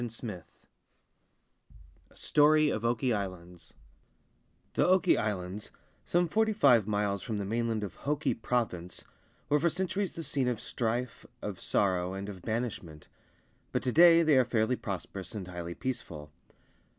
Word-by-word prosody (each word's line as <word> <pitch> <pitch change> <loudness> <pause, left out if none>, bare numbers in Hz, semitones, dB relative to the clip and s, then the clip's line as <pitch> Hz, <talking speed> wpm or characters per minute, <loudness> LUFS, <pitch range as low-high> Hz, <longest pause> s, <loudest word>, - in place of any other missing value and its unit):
100 120 -2 -3
XVII 105 -7 -6 1.7
A - - -24
STORY 150 +1 +4
OF 110 - -3
OKI 120 +1 +1
ISLANDS 90 -4 -6 1.0
THE - - +2
Oki 185 0 +4
Islands, 100 -1 -3 0.4
some 175 0 +2
forty 220 +4 +1
five 125 - +4
miles 105 -2 0
from 110 - -4
the 100 - -3
mainland 115 +1 -1
of 100 -2 -6
Hoki 150 +1 -1
Province, 110 -7 -2 0.4
were 150 - +3
for 170 +3 +2
centuries 185 +3 -2
the 165 - -5
scene 140 -3 0
of 120 -3 -1
strife, 120 +1 -3 0.2
of - - -5
sorrow, 90 -2 0
and 100 +1 -5
of 95 -3 -9
banishment; 110 -8 -4 0.6
but - - -1
to 125 - 0
day 170 +3 +7
they 155 -3 +4
are 130 - +6
fairly 115 0 +1
prosperous 95 -2 -6
and 95 -4 -5
highly 85 -1 -6
peaceful. 75 - -5
115 Hz, 150 wpm, -30 LUFS, 95-145 Hz, 1.7 s, day